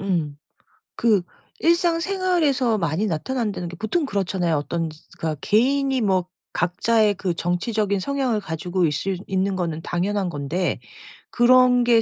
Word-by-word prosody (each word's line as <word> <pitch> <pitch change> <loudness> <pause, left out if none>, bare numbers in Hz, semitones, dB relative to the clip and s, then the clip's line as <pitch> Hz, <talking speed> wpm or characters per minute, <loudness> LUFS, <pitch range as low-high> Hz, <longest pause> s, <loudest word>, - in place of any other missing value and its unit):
음. 170 -7 -1 0.6
그 220 -5 +3 0.4
일상생활에서 335 - +2
많이 170 +3 0
나타난다는 210 +1 -2
게 175 - -8
보통 225 - -1
그렇잖아요. 185 - 0
어떤 165 +3 -2 0.3
그러니까 155 -2 -2
개인이 265 +4 +2
뭐 190 -4 +1 0.3
각자의 215 +3 +2
그 185 -2 -2
정치적인 200 +4 0
성향을 260 0 0
가지고 175 +2 -1
있을 165 +6 -1
있는 190 0 0
거는 165 -3 -2
당연한 190 +2 -1
건데 155 +4 -2 0.5
그런 250 0 +5
게 235 -1 +5
200 Hz, 305 characters per minute, -23 LUFS, 175-250 Hz, 0.6 s, 그런